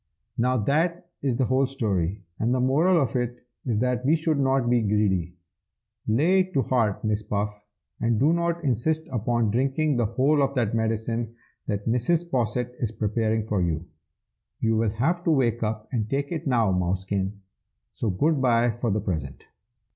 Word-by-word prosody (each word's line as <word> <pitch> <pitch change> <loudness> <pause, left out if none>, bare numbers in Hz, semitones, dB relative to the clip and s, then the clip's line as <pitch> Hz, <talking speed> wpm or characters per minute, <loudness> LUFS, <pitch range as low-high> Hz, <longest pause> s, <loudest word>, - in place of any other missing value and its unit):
"Now 125 +2 +1
that 170 - 0
is 130 -4 0
the 130 - +2
whole 130 +2 +2
story, 100 - -1 0.2
and 120 +3 +1
the - - 0
moral 155 +8 +3
of 130 -5 -1
it 120 -1 -3 0.2
is 115 -4 +1
that 125 -1 0
we 145 +5 +4
should 155 -2 0
not 135 -2 +2
be 120 -1 +3
greedy. 100 -5 0 0.7
Lay 155 +13 +3
it 185 -1 -1
to 135 - +3
heart, 115 -4 0
my 110 - +2 0.2
Puff, 105 0 -2 0.4
and 115 -2 +1
do 150 +6 +4
not 170 0 -1
insist 155 +5 0
upon 120 -2 0
drinking 135 +4 +1
the 120 -3 +2
whole 135 +6 +2
of 140 0 0
that 115 -4 0
medicine 115 +1 -1 0.3
that 100 0 -3
Mrs. 160 +9 +1
Posset 125 0 -1
is 115 -3 -1
preparing 110 0 0
for 105 -3 -1
you. 85 -1 -1 0.7
You 115 0 +1
will 110 0 +2
have 155 +12 0
to - - +2
wake 125 -6 +2
up 110 -1 -2
and 110 -4 -1
take 140 +2 -1
it 160 -3 -3
now, 115 -6 +2
Mousekin, 95 +2 -1 0.6
so 115 - -2
good 145 - +1
bye 120 -2 +3
for 120 +1 -2
the 105 +1 0
present!" 80 -9 -4
120 Hz, 175 wpm, -25 LUFS, 105-135 Hz, 0.7 s, we